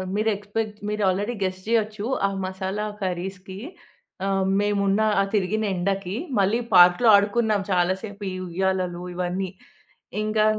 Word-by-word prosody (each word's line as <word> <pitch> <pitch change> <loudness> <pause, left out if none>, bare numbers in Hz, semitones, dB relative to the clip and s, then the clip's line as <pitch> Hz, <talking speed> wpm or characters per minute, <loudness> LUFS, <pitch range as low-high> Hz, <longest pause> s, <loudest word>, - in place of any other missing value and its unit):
మీరు 215 +2 +1
ఎక్స్పెక్ట్ 210 +1 -4
మీరు 210 0 -1
already 205 +6 -1
guess 185 0 -2
చేయొచ్చు. 215 -2 0 0.2
ఆ - - -1 0.2
మసాలా 190 +2 -3 0.2
కర్రీస్‌కి. 185 +1 -4 0.7
ఆహ్, 195 -1 +1
మేమున్న 205 0 +1 0.2
ఆ - - +3
తిరిగిన 210 +2 0
ఎండకి. 195 +1 -1 0.2
మళ్ళీ 200 +4 +2 0.2
పార్క్‌లో 180 +6 +7
ఆడుకున్నాం 205 +1 +2
చాలా 180 0 +3
సేపు. 205 -1 -8
ఈ - - -5
ఉయ్యాలలు 185 0 -1
ఇవన్నీ. 180 +1 -2 0.7
ఇంకా 215 0 +2
195 Hz, 130 wpm, -24 LUFS, 185-210 Hz, 0.7 s, పార్క్‌లో